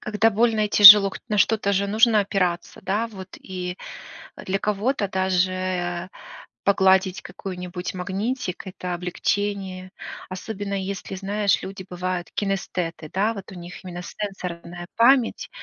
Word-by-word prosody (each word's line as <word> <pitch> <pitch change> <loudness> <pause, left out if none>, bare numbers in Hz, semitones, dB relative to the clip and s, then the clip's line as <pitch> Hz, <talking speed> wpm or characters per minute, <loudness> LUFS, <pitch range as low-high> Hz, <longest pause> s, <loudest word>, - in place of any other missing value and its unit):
когда 215 +1 +2
больно 220 0 +2
и - - -8
тяжело, 205 -1 +10
к - - -8
на 210 -1 0
что-то 205 0 +2
же 200 +1 +1
нужно 220 +1 +4
опираться, 180 -3 -2
да, 210 +5 -1
вот. 190 -4 -10
И 180 -1 -6 0.6
для 195 +1 -3
кого-то 210 +2 -1
даже 185 -1 -1 0.6
погладить 190 -1 +3
какой-нибудь 180 -1 -6
магнитик- 195 +2 -3
это 180 -1 -5
облегчение. 185 +1 -3 0.4
Особенно 200 +1 -5
если, 195 0 -5
знаешь, 200 +1 0
люди 190 -1 -8
бывают 180 0 -3
кинестеты, 180 -5 -3
да, 210 +4 +1
вот 200 -1 -9
у - - -10
них 175 +2 -10
именно 175 -1 -7
сенсорная 175 -3 -7
память, 240 +1 +3
190 Hz, 130 wpm, -23 LUFS, 180-205 Hz, 0.6 s, тяжело